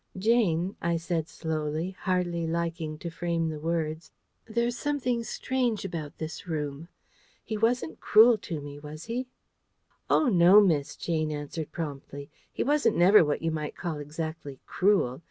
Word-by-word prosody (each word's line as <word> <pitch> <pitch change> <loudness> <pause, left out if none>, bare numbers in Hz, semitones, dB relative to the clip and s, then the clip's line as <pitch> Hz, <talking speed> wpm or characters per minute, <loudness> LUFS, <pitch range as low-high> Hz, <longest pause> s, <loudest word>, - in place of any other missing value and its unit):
"Jane," 190 -4 +2
I 170 0 +1
said 165 -1 -2
slowly, 160 +2 -3
hardly 180 -3 -1
liking 165 -2 -2
to 170 +2 -6
frame 165 -1 -1
the 155 -1 -5
words, 160 0 -2 0.4
"there's 235 +1 -1
something 250 -4 -1
strange 245 -3 -1
about 160 -5 -5
this 160 +2 -6
room. 150 -1 -4 0.6
He 220 - -4
wasn't 225 -7 0
cruel 220 +1 +6
to 165 -4 -5
me, 145 0 -8
was 150 +2 -9
he?" 245 +3 -3 0.8
"Oh! 305 - +4
no, 185 -1 +7
miss," 160 -9 +2
Jane 155 -2 -1
answered 150 +1 -5
promptly. 140 -2 -6 0.2
"He - - -2
wasn't 295 +2 +2
never 185 +3 +7
what 150 +1 -1
you 165 - +1
might 155 -1 -4
call 165 -4 -4
exactly 155 -1 -6
cruel. 180 -10 +2
165 Hz, 150 wpm, -28 LUFS, 155-205 Hz, 0.8 s, no